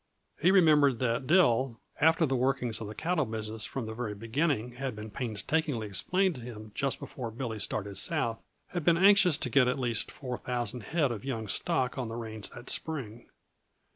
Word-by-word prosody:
He 170 - +5
remembered 150 -8 +5
that 125 +1 -1
Dill, 135 -8 +3 0.2
after 160 +2 +4
the 135 -2 0
workings 125 -3 0
of 110 - -4
the 105 - -8
cattle 170 -1 0
business 110 -2 -4
from 130 -4 -4
the 110 - -5
very 110 -3 -4
beginning 120 +2 -1
had 130 0 -4
been 105 0 -8
painstakingly 125 - -1
explained 180 - +1
to 125 - -9
him 110 -3 -9
just 135 +3 0
before 120 -3 -6
Billy 115 -1 -5
started 100 -1 -2
south, 115 +3 -1 0.3
had 175 -3 -3
been 170 +1 +4
anxious 190 -4 +6
to 125 - -3
get 130 -1 +5
at 125 - +1
least 120 -4 -1
four 125 -3 -6
thousand 120 -1 -2
head 150 +2 0
of 110 -4 -5
young 115 -5 -3
stock 130 - 0
on 125 - -2
the 115 - -5
range 110 -3 -4
that 120 +1 -12
spring. 125 -8 -4
125 Hz, 190 wpm, -30 LUFS, 110-145 Hz, 0.3 s, anxious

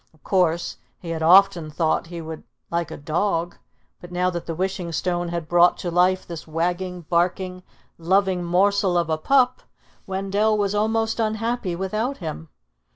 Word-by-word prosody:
Of 155 - -30
course, 175 -3 +1 0.2
he 170 - -7
had 160 -1 -3
often 180 -1 +5
thought 160 +1 0
he 170 0 -7
would 160 0 -7 0.3
like 170 -1 -1
a - - -7
dog; 170 +3 -1 0.4
but 175 - -12
now 180 +1 +1
that 170 -1 -5
the 165 - -3
Wishing 185 -1 -2
Stone 175 +1 -1
had 170 -2 -4
brought 175 +1 +5
to 175 - -4
life 180 +2 +2
this 165 -2 -8
wagging, 175 +3 -2
barking, 180 +2 -1 0.4
loving 185 +1 +2
morsel 190 +1 +2
of 170 -2 0
a 155 - 0
pup, 255 +5 +3 0.5
Wendell 195 +3 +1
was 200 -1 0
almost 225 +2 0
unhappy 220 -3 -1
without 215 +9 -2
him. 160 -2 -6
180 Hz, 160 wpm, -23 LUFS, 170-195 Hz, 0.5 s, often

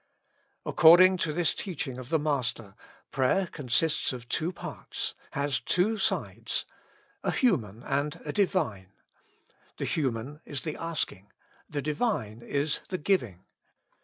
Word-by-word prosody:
According 185 +3 +7
to 165 -3 0
this 170 +2 +3
teaching 140 -9 -4
of 125 -1 -9
the 160 - +3
Master, 130 -9 -1 0.4
prayer 135 +9 +2
consists 150 0 +1
of 125 -2 -7
two 165 +7 0
parts, 175 - -4 0.2
has 140 -2 0
two 185 - +1
sides, - - 0 0.6
a - - -1
human 120 - +1
and 145 +4 -1
a 150 - -3
Divine. 150 - 0 0.8
The - - -2
human 135 +1 -2
is 140 -3 -3
the 155 -2 -3
asking, 150 - -3 0.4
the 145 -2 -3
Divine 145 - -1
is 140 +4 0
the 185 - -1
giving. 125 - 0
145 Hz, 130 wpm, -28 LUFS, 125-170 Hz, 0.8 s, According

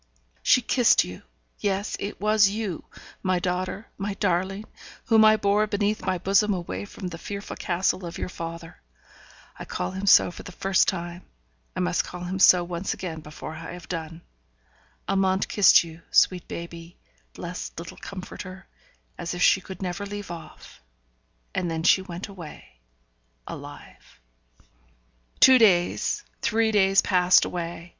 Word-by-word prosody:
She 255 -1 +4
kissed 245 0 +4
you 90 0 -9 0.4
yes! 200 0 -1
it 200 - -5
was 210 0 +4
you, 205 -5 -4 0.4
my 185 -1 +1
daughter, 180 +3 -2
my 200 0 -3
darling, 195 +1 -1 0.4
whom 220 -1 +5
I 215 0 +6
bore 205 +1 +2
beneath 210 +1 0
my 185 - +1
bosom 200 +3 +2
away 175 +3 -5
from 200 -1 -7
the 165 -1 -8
fearful 200 +2 -6
castle 185 +1 -1
of 170 0 -6
your - - -3
father 165 -1 -8 0.8
I - - -6
call 90 - -3
him 190 +2 -5
so 180 - +6
for - - -10
the - - -10
first 195 +2 +2
time, 175 -2 -3 0.5
I - - -1
must 85 -1 +1
call 180 - -8
him 185 +2 -4
so 180 -2 +7
once 175 +2 -3
again 165 -4 -6
before 155 +1 -9
I 160 +1 -8
have 175 0 -10
done 165 -1 -6 0.8
Amante 190 -1 +1
kissed 200 -4 +6
you, 165 0 -11
sweet 180 -2 +3
baby, 170 0 -8 0.4
blessed 175 +1 -7
little 170 +1 -8
comforter, 185 0 -8 0.5
as 170 0 -4
if 175 - 0
she 190 - +5 0.2
never 185 +2 -3
could 200 - -10
leave 205 -2 -6
off. 165 - -11 0.7
And 180 -2 -1
then 160 0 -3
she 185 +2 +5
went 180 +1 -7
away, 170 - -12 0.7
alive. - - -11 1.2
Two 260 -1 +8
days, 180 -6 +3 0.2
three 225 0 +2
days 195 -2 +4
passed 180 -1 +4
away. 170 0 -5
185 Hz, 150 wpm, -25 LUFS, 170-200 Hz, 1.2 s, Two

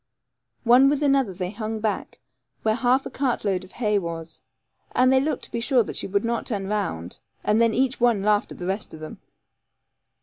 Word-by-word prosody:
One 250 +3 +6
with 290 +1 0
another 275 -6 +3
they 180 0 -4
hung 220 +1 -4
back, 215 -1 -3 0.5
where 220 - +3
half 250 +3 +2
a - - -6
cart 260 -5 -1
load 190 -2 0
of 185 - -15
hay 210 -4 +1
was, 165 -2 -6 0.5
and 255 +1 +4
they 260 - +5
looked 285 0 -1
to - - -9
be 235 - -2
sure 245 0 +3
that - - -7
she - - -3
would 200 +3 0
not 235 0 -1
turn 200 -4 -2
round; 190 - -3 0.2
and 215 +2 +3
then 230 -1 +4
each 260 0 +1
one 235 -5 +3
laughed 210 0 +2
at - - -8
the 175 - -6
rest 195 -1 -3
of - - -11
them. 155 0 -9
220 Hz, 210 wpm, -24 LUFS, 195-250 Hz, 0.5 s, One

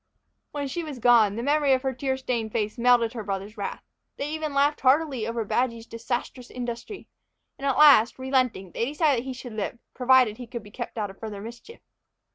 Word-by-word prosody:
When 285 -1 -4
she 335 +6 -4
was 300 -4 -7
gone, 230 -4 +4
the 230 - -4
memory 290 0 +3
of 260 0 0
her 265 -1 -1
tear 265 +1 -2
stained 235 -4 -2
face 215 -1 -2
melted 240 -1 +4
her 225 -3 -5
brothers' 200 +1 -5
wrath. 200 -3 -5 0.3
They 285 +2 -3
even 310 -2 -3
laughed 285 +2 +2
heartily 265 -4 +2
over 230 -1 -2
Badgy's 230 0 -1
disastrous 240 +2 -5
industry; 245 - -6 0.5
and 275 - -2
at 270 - +1
last, 280 -7 +7
relenting, 255 -8 0
they 230 - -1
decided 290 -1 +1
that 240 - -7
he 260 - -3
should 250 -2 -9
live, 215 +2 -4 0.2
provided 255 -4 +4
he 245 - -8
could 235 -2 -7
be 205 - -14
kept 240 0 -7
out 205 -3 -2
of 195 - -19
further 215 -3 -6
mischief. 235 - -11
245 Hz, 205 wpm, -26 LUFS, 225-275 Hz, 0.5 s, last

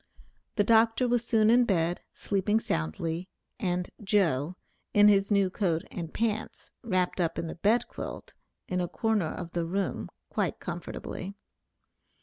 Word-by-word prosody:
The 205 - +3
Dr. 225 +3 +4
was 240 -1 +2
soon 220 -2 +4
in 245 +1 +6
bed, 175 -5 +1
sleeping 205 +2 +1
soundly, 165 - -2 0.3
and 180 -4 -1
"Joe," 180 -6 +2 0.4
in 205 0 +8
his 200 -1 +4
new 200 -3 +3
coat 175 -4 0
and 165 -3 -5
pants, 220 -1 -2
wrapped 185 -5 0
up 165 -1 0
in - - -2
the 165 - -4
bed 220 +7 +2
quilt, - - -7 0.3
in 180 0 -1
a 175 - -1
corner 215 -5 0
of 175 -2 -6
the 170 -1 -1
room 195 +3 -2 0.2
quite - - -1
comfortably. 195 +2 -6
195 Hz, 145 wpm, -29 LUFS, 175-220 Hz, 0.4 s, in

